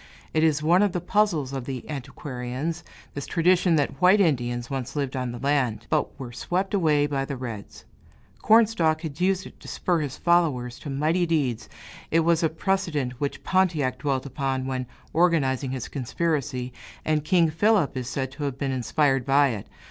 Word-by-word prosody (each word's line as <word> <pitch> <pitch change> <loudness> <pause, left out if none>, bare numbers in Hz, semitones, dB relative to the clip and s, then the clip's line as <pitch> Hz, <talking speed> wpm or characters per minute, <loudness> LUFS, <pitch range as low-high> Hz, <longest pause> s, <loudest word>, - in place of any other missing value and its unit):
It 155 - +2
is 155 -2 +2
one 175 +4 +4
of 205 -3 +2
the 180 - 0
puzzles 175 -7 +1
of 135 -3 -4
the 130 -2 -6
antiquarians, 140 +3 -5 0.3
this 140 - -5
tradition 180 0 +3
that 145 +1 -1
white 185 +3 +6
Indians 120 -9 +1
once 135 0 -4
lived 140 -2 -2
in 125 -2 -2
the 120 - -6
land, 125 -5 0
but 155 0 0
were 125 -3 -6
swept 185 - -2
away 155 -7 +3
by 140 -2 -1
the 135 0 -5
reds; 115 -5 -8 0.6
Cornstalk 210 -8 +4
had 160 0 -6
used 190 0 +1
it - - -13
to - - -13
spur 175 -2 0
his 145 -2 -4
followers 150 -9 +1
to 145 - -7
mighty 155 +6 +1
deeds, 140 -8 -1 0.4
it 165 - +3
was 165 0 +2
a 165 - +2
precedent 160 -6 -1
which 145 - -3
Pontiac 155 -9 +1
dwelt 135 -1 -1
upon 135 -1 -2
when 130 -1 -3 0.3
organizing 145 -6 +2
his 130 -2 -4
conspiracy, 135 -2 -2 0.3
and 155 -1 +1
King 165 0 +3
Philip 190 -3 +2
is 125 -1 -3
said 130 -1 -3
to 145 +1 -5
have 135 -2 -3
been 135 -1 -2
inspired 135 +2 +1
by 140 +2 +4
it. 110 -5 -5
145 Hz, 180 wpm, -25 LUFS, 130-170 Hz, 0.6 s, white